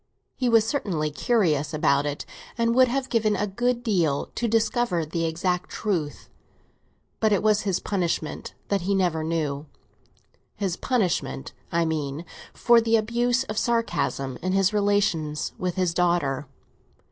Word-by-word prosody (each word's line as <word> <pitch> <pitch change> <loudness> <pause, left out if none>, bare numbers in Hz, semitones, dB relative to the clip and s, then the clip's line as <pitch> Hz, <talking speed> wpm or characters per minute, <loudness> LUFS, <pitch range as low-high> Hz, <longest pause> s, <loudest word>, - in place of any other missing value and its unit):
He 250 -2 0
was 225 -2 +5
certainly 185 - -1
curious 155 - +1
about 145 -1 +2
it, 145 0 -4 0.3
and 230 0 +2
would 255 +1 +6
have 260 +2 -1
given 220 -4 +1
a 205 - 0
good 240 +4 -1
deal 170 - 0
to 235 - -1
discover 225 -5 +1
the 165 +2 -2
exact 180 +2 -1
truth; 170 -9 -3 0.9
but 220 -1 +2
it 205 - +2
was 215 -1 +3
his 195 -3 0
punishment 170 -6 -2
that 200 -2 +1
he 195 +3 0
never 175 -4 +1
knew—his 160 +4 -6
punishment, 175 - -1 0.2
I 170 0 +2
mean, 155 0 -3 0.3
for 235 -1 +4
the 230 0 +2
abuse 240 +3 +1
of 215 -5 -3
sarcasm 225 - -1
in 185 +1 -1
his 195 +1 +3
relations 200 -7 +1
with 180 -1 -2
his 180 -3 0
daughter. 170 -6 +1
185 Hz, 145 wpm, -25 LUFS, 160-225 Hz, 0.9 s, would